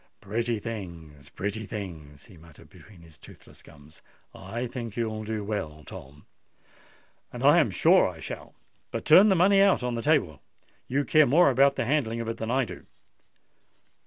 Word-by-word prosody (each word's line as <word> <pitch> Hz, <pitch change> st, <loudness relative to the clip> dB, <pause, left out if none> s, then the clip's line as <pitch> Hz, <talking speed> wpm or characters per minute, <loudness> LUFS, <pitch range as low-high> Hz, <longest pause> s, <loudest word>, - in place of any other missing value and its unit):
"Pretty 115 Hz, +3 st, -2 dB
things—pretty 95 Hz, 0 st, -7 dB
things!" 80 Hz, -9 st, -9 dB
he 95 Hz, -, -17 dB
muttered 80 Hz, -2 st, -18 dB
between 100 Hz, -5 st, -17 dB
his 80 Hz, -2 st, -18 dB
toothless -, -, -17 dB
gums. 75 Hz, +1 st, -18 dB, 0.3 s
"I 120 Hz, +2 st, -6 dB
think 120 Hz, -3 st, -7 dB
you'll 110 Hz, -2 st, -3 dB
do 110 Hz, -1 st, -4 dB
well, 80 Hz, -8 st, -5 dB
Tom." 70 Hz, +2 st, -12 dB, 1.1 s
"And -, -, -8 dB
I -, -, +6 dB
am -, -, +2 dB
sure -, -, +4 dB
I -, -, -11 dB
shall. -, -, -9 dB, 0.3 s
But -, -, -6 dB
turn 190 Hz, +7 st, +7 dB
the 190 Hz, -, +3 dB
money 195 Hz, +3 st, +4 dB
out 195 Hz, -10 st, +3 dB
on 125 Hz, -1 st, -2 dB
the 115 Hz, -, -3 dB
table: 115 Hz, -, 0 dB, 0.5 s
you 140 Hz, +2 st, -1 dB
care 155 Hz, -2 st, +4 dB
more 150 Hz, +3 st, +4 dB
about 135 Hz, +2 st, +3 dB
the -, -, -2 dB
handling 120 Hz, -4 st, -1 dB
of 115 Hz, -, -5 dB
it 115 Hz, -, -4 dB
than 110 Hz, -, -5 dB
I 130 Hz, +1 st, +1 dB
do." -, -, -11 dB
110 Hz, 170 wpm, -26 LUFS, 85-130 Hz, 1.1 s, turn